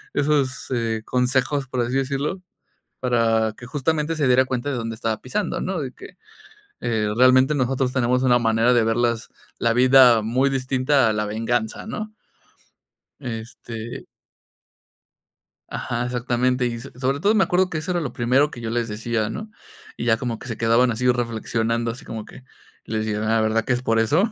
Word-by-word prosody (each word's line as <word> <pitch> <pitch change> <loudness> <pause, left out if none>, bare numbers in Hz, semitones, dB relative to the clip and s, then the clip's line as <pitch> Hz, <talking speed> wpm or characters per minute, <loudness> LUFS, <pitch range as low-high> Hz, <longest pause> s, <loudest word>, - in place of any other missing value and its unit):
esos, 145 -3 0
eh, 115 -3 -1
consejos, 130 +2 0
por 125 0 -2
así 120 +1 -2
decirlo, 140 +7 -2 0.6
para 115 -3 +2
que 120 - -11
justamente 150 +3 -1
se 150 -3 +1
diera 130 +1 +5
cuenta 130 +2 -2
de 135 - -2
dónde 115 -1 -4
estaba 110 -1 -2
pisando, 190 +11 -2
¿no?, 185 -2 -2
de 130 -3 -5
que, - - -13 0.6
eh, 110 -3 0
realmente 130 +3 +5
nosotros 130 -1 0
tenemos 125 0 +1
una 125 -2 +4
manera 115 +1 +2
de 120 -2 +4
ver 115 0 +1
las 115 -1 0 0.3
la 115 - +2
vida 125 -2 +6
muy 125 +5 +1
distinta, 130 0 +2
a - - +2
la 105 0 -1
venganza, 110 - -2
¿no? 215 -1 -6 1.1
Este 115 -1 -7 1.6
Ajá, 120 0 -3
exactamente. 125 +1 0
Y 115 -1 -3
so - - -10
sobre 135 +2 0
todo 205 +6 +3
me 205 -3 +4
acuerdo 180 +2 +2
que 170 - -5
eso 160 +4 -5
era 175 -1 0
lo 135 -7 -4
primero 130 +5 +2
que 120 - -9
yo 110 - -3
les 120 0 -1
decía, 110 0 -2
¿no?, 215 - -6 0.5
y - - -3
ya 115 -2 +4
como 115 -1 -4
que - - -10
se 115 - -4
quedaban 115 +3 +3
así 125 +2 +1
reflexionando, 115 -1 -1
así 115 - -8
como 110 -2 -6
que, 125 - -14 0.4
les 110 0 -2
dije: 105 -1 -2
"Ah, 110 +1 +1
¿verdad 110 +1 +1
que 125 - +2
es 125 - -3
por 115 -2 +1
eso?", 155 - +2
125 Hz, 185 wpm, -22 LUFS, 115-135 Hz, 1.6 s, vida